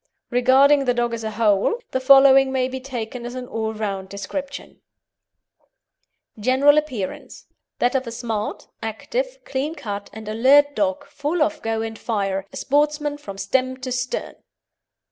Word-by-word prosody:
Regarding 270 Hz, +3 st, +5 dB
the 245 Hz, -1 st, +1 dB
dog 240 Hz, -1 st, 0 dB
as 230 Hz, -1 st, -4 dB
a 220 Hz, -, -2 dB
whole, 215 Hz, -, +2 dB
the 260 Hz, -, 0 dB
following 270 Hz, 0 st, +6 dB
may 260 Hz, -1 st, +1 dB
be 260 Hz, 0 st, -5 dB
taken 250 Hz, -2 st, -6 dB
as 240 Hz, +1 st, -6 dB
an 250 Hz, -1 st, -6 dB
all 220 Hz, -2 st, -3 dB
round 200 Hz, -3 st, -4 dB
description: 275 Hz, +8 st, -6 dB, 1.6 s
GENERAL 265 Hz, +6 st, +5 dB
APPEARANCE 245 Hz, -11 st, -6 dB, 0.3 s
That 245 Hz, -, +1 dB
of 265 Hz, -2 st, -1 dB
a -, -, -4 dB
smart, 225 Hz, -3 st, -4 dB
active, -, -, -3 dB
clean 280 Hz, +4 st, -3 dB
cut 205 Hz, -7 st, -6 dB
and 220 Hz, -1 st, -10 dB
alert 275 Hz, +7 st, +4 dB
dog, 290 Hz, -1 st, 0 dB
full 295 Hz, +3 st, -1 dB
of 310 Hz, 0 st, -2 dB
go 225 Hz, 0 st, -1 dB
and 225 Hz, -1 st, -6 dB
fire 195 Hz, -4 st, -2 dB
a -, -, -8 dB
sportsman 295 Hz, +1 st, 0 dB
from 200 Hz, -8 st, -9 dB
stem 255 Hz, +6 st, 0 dB
to 255 Hz, 0 st, -4 dB
stern. 250 Hz, 0 st, -3 dB
255 Hz, 155 wpm, -22 LUFS, 220-280 Hz, 1.6 s, following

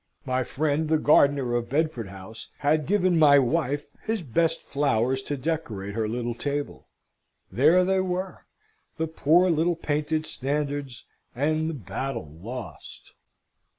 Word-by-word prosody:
My 130 Hz, -1 st, 0 dB
friend 150 Hz, +4 st, -1 dB
the 160 Hz, -, +4 dB
gardener 140 Hz, -4 st, +3 dB
of 120 Hz, -1 st, -1 dB
Bedford 145 Hz, -6 st, -1 dB
House 95 Hz, +3 st, -10 dB
had 150 Hz, 0 st, +1 dB
given 185 Hz, -4 st, +2 dB
my 145 Hz, -2 st, +7 dB
wife 145 Hz, +1 st, 0 dB, 0.2 s
his 220 Hz, -4 st, -2 dB
best 165 Hz, +5 st, 0 dB
flowers 130 Hz, -2 st, 0 dB
to 145 Hz, +2 st, -4 dB
decorate 125 Hz, -10 st, -3 dB
her 110 Hz, 0 st, -1 dB
little 120 Hz, +1 st, -2 dB
table. 145 Hz, +4 st, -4 dB, 0.6 s
There 160 Hz, +8 st, +4 dB
they 190 Hz, 0 st, +2 dB
were; 185 Hz, 0 st, -4 dB, 0.5 s
the 160 Hz, -, 0 dB
poor 160 Hz, +3 st, +3 dB
little 165 Hz, +2 st, +1 dB
painted 155 Hz, 0 st, -1 dB
standards 140 Hz, -3 st, -3 dB, 0.3 s
and 155 Hz, +4 st, 0 dB
the 165 Hz, -, -4 dB
battle 100 Hz, -, -5 dB
lost! 120 Hz, +4 st, -9 dB
145 Hz, 135 wpm, -26 LUFS, 125-160 Hz, 0.6 s, my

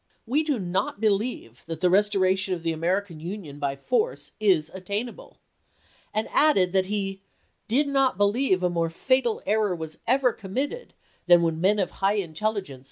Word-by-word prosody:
x. -, -, -44 dB
"We 270 Hz, +7 st, +1 dB
do 300 Hz, -4 st, 0 dB
not 185 Hz, 0 st, -2 dB
believe 205 Hz, -, -1 dB
that 165 Hz, -1 st, -5 dB
the 180 Hz, -, +3 dB
restoration 190 Hz, -1 st, +2 dB
of 170 Hz, -, -9 dB
the 165 Hz, -, 0 dB
American 175 Hz, +1 st, -1 dB
Union 165 Hz, -4 st, -7 dB
by 140 Hz, -1 st, -1 dB
force 450 Hz, -, -1 dB
is 180 Hz, -7 st, +2 dB
attainable," 200 Hz, +6 st, -5 dB, 0.7 s
and 215 Hz, -, -1 dB
added 195 Hz, -13 st, +3 dB
that 190 Hz, -1 st, +2 dB
he 195 Hz, -1 st, -3 dB, 0.2 s
" -, -, -45 dB
did 275 Hz, +6 st, +2 dB
not 270 Hz, -6 st, +2 dB
believe 205 Hz, -1 st, +2 dB
a -, -, +4 dB
more 165 Hz, -1 st, 0 dB
fatal 240 Hz, +6 st, 0 dB
error 210 Hz, -2 st, +1 dB
was 160 Hz, -2 st, -8 dB
ever 255 Hz, 0 st, +3 dB
committed 270 Hz, -, -4 dB, 0.3 s
than 175 Hz, -1 st, +7 dB
when 165 Hz, -1 st, -1 dB
men 200 Hz, +3 st, +3 dB
of 190 Hz, -4 st, 0 dB
high 195 Hz, +2 st, 0 dB
intelligence 195 Hz, -4 st, -3 dB
195 Hz, 170 wpm, -25 LUFS, 175-220 Hz, 0.7 s, than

